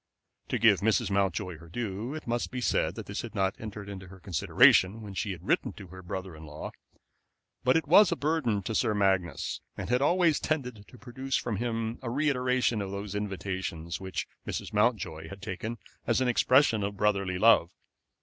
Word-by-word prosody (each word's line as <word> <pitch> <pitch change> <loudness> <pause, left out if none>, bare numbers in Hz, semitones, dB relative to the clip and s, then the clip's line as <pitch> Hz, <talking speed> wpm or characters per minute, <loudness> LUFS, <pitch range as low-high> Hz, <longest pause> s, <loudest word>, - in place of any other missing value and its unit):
To - - -1
give - - +5
Mrs. 110 0 +1
Mountjoy 95 -3 0
her 85 0 -14
due, 110 - -4
it 155 - -7
must 120 0 -1
be 130 - -4
said 125 - +1
that - - -7
this - - -4
had - - -8
not 95 0 +1
entered 105 -2 -7
into 95 -2 -8
her 95 +1 -13
consideration 95 +4 +4
when 100 -2 -8
she 100 +2 -2
had 85 -3 -8
written - - +1
to 95 - -11
her 95 +1 -10
brother 95 -1 -6
in 80 - -12
law; 75 0 -7 0.9
but 130 +4 +4
it 160 - -2
was 185 +4 +7
a - - +2
burden 140 -10 0
to 115 - -3
Sir 105 0 +1
Magnus, 95 -4 0 0.2
and - - -4
had 125 +1 +3
always 170 0 +3
tended 125 -9 -3
to 125 - -15
produce 130 +2 -3
from 115 -4 -2
him 115 0 -2
a 125 - -4
reiteration 125 -4 +1
of 100 - -4
those 100 0 -5
invitations, 95 -5 -4
which 95 -1 -3 0.2
Mrs. - - -4
Mountjoy 100 -8 0
had 100 - -9
taken 105 +4 -5 0.3
as 115 +1 +3
an 130 - +1
expression 125 -1 +4
of 100 0 -3
brotherly 100 -3 +1
love. 105 -4 +5
105 Hz, 195 wpm, -29 LUFS, 95-125 Hz, 0.9 s, was